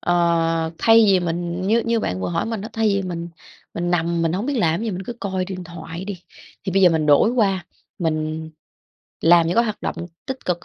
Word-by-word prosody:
Ờ, 165 -2 +1
thay 225 0 +6
vì 190 -2 +4
mình 175 0 -3
như 225 +3 +3
như 230 -1 +1
bạn 90 - -2
vừa - - -2
hỏi 170 +2 -1
mình 225 -2 -3
á, 215 - -6
thay 225 -1 +1
vì 200 -1 +1
mình 170 -2 -5 0.5
mình 175 0 -2
nằm 170 -1 +1
mình 165 -1 +1
hổng 195 +7 -2
biết 285 - -1
làm 170 -2 +1
cái - - -3
gì, - - -1
mình 185 -1 -4
cứ 240 - -5
coi 190 -2 -2
điện 185 -1 -6
thoại 165 +1 -8
đi, 195 -3 -6 0.4
thì 190 - -2
bây 195 +1 +3
giờ 180 - +7
mình 160 -2 0
đổi 150 +10 +5
qua 195 -7 +1 0.3
mình 160 -1 -2 0.7
làm 170 0 +5
những 170 - 0
cái 235 - +5
hoạt 215 -2 -4
động - - -3 0.3
tích 265 -1 -5
cực 175 -1 -2
175 Hz, 235 wpm, -21 LUFS, 165-200 Hz, 0.7 s, giờ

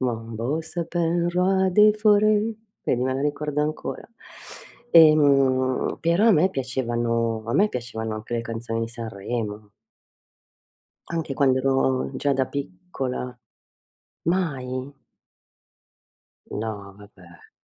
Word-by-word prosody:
Mon 115 -3 -3
beau 125 +8 -2
sapin, 170 +1 -1
roi 190 +2 +2
des 210 +2 +6
forêts, 215 +1 +3 0.3
vedi 125 - 0
me 130 0 0
la 135 - -2
ricordo 150 0 -1
ancora. 155 +1 -4 0.9
Ehm, 140 -5 +4
però 170 +6 +2
a - - +7
me 180 +1 +4
piacevano 120 -4 -1
a 115 - -2
me 205 +8 +4
piacevano 115 - -4
anche 110 +2 -8
le 115 - 0
canzoni 115 0 -4
di 115 - -2
Sanremo. 110 -2 -5 1.4
Anche 165 -5 -3
quando 130 -2 +3
ero 135 -1 +1
già 140 +1 +1
da 135 -1 +1
piccola. 125 - -5 0.9
Mai? 140 -6 -2 1.6
No, 105 -2 -5
vabbè. 95 -4 -17
130 Hz, 110 wpm, -24 LUFS, 115-165 Hz, 1.6 s, a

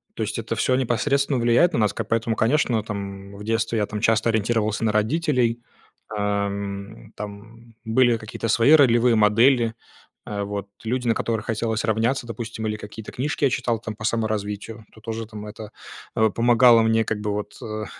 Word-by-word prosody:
То 110 - -2
есть, 105 +1 -3
это 115 0 -3
всё 130 +4 +1
непосредственно 135 +2 +1
влияет 120 +9 +3
на - - +1
нас 105 -2 +2
как, 115 -2 -5
поэтому, 115 0 0
конечно, 120 -1 +2
там, 100 -2 -6
м, - - -11
в 105 - -9
детстве 115 +1 0
я, 105 - +1
там, 105 0 -5
часто 110 0 +2
ориентировался 110 -1 0
на 110 - +2
родителей, 120 +1 +1 0.5
ам. 100 0 -3
Там 110 +3 -10
были 120 +1 +3
какие-то 110 +1 -5
свои 115 +5 +4
ролевые 120 -5 +5
модели, 115 +2 +4 0.5
а, 100 -1 -3
вот. 100 0 -4 0.2
Люди, 125 +2 -2
на 115 - +3
которых 110 -1 -2
хотелось 110 -1 -1
равняться, 115 +3 0
допустим, 115 -1 -5
или 105 - -2
какие-то 105 +1 -9
книжки 145 +3 -1
я - - +4
читал, 120 -2 -1
там, 110 0 -6
по 110 - -10
саморазвитию. 110 0 -3
Это 110 - -18
тоже, 115 0 -5
там, 105 -1 -9
это, 105 0 -9 0.4
э, 110 0 +3
помогало 120 +2 +5
мне 115 0 +3
как 110 - -2
бы 105 0 -2
вот, 105 0 -4
э, 110 -1 -5
110 Hz, 185 wpm, -23 LUFS, 105-120 Hz, 0.5 s, ролевые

